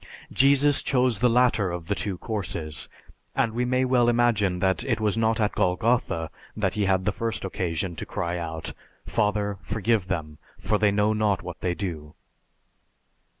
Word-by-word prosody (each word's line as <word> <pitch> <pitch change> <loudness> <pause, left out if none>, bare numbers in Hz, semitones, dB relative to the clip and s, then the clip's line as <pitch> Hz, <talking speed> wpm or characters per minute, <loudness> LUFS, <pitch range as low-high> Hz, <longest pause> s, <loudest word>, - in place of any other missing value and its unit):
Jesus 140 +1 +4
chose 125 -5 +1
the 125 - +4
latter 120 -5 +3
of 85 -1 -5
the 100 - 0
two 100 -2 -3
courses, 85 - -2 0.5
and 110 - +1
we 120 +2 0
may 125 +1 +1
well 125 -2 +3
imagine 115 -6 +2
that 95 +4 +1
it 120 -4 0
was 105 -1 +1
not 115 0 +1
at 105 -2 +1
Golgotha 90 -4 0 0.3
that - - 0
he 105 -1 0
had 95 -1 +1
the 105 - +2
first 115 -2 -3
occasion 90 -1 -2
to - - -5
cry 85 0 -2
out, 80 -1 -5 0.3
"Father, 105 -1 0
forgive 110 -2 0
them 75 -5 -4 0.2
for 105 - 0
they 105 - +4
know 105 +1 +2
not 105 -4 +1
what 90 -2 -7
they 90 -1 -1
do!" 80 -6 -5
105 Hz, 170 wpm, -25 LUFS, 90-115 Hz, 0.5 s, Jesus